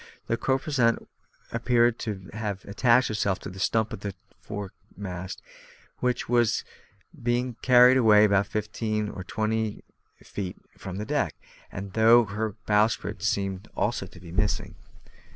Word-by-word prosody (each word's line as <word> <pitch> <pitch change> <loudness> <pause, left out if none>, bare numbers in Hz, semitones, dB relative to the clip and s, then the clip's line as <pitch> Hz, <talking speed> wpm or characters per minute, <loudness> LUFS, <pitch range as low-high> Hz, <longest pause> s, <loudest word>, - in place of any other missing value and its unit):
The 115 - 0
corposant 130 -1 +1 0.5
appeared 120 0 +2
to 95 -4 -5
have 105 -3 -4
attached 120 +4 +3
itself 100 -3 0
to 100 - -7
the 95 - -10
stump 110 +3 +1
of - - -7
her 100 -2 -4 0.3
foremast, 95 -2 -7 0.6
which 125 -1 0
had 120 -1 +3 0.7
been 120 +1 0
carried 125 0 +7
away 105 -4 +6
about 100 -1 +3
fifteen 110 0 -2
or 95 - -7
twenty 110 +2 -2 0.4
feet 95 -3 -5 0.2
from 95 -1 -7
the 105 - -3
deck, - - -1 0.4
and 95 +1 -6
I 110 - -2
thought 115 +1 +7
her 105 0 -2
bowsprit 105 -2 +1
seemed 100 -1 -1
also 105 -3 -1
to 90 - -15
be 85 -2 -11
missing. 100 +4 -1
110 Hz, 140 wpm, -26 LUFS, 100-120 Hz, 0.7 s, carried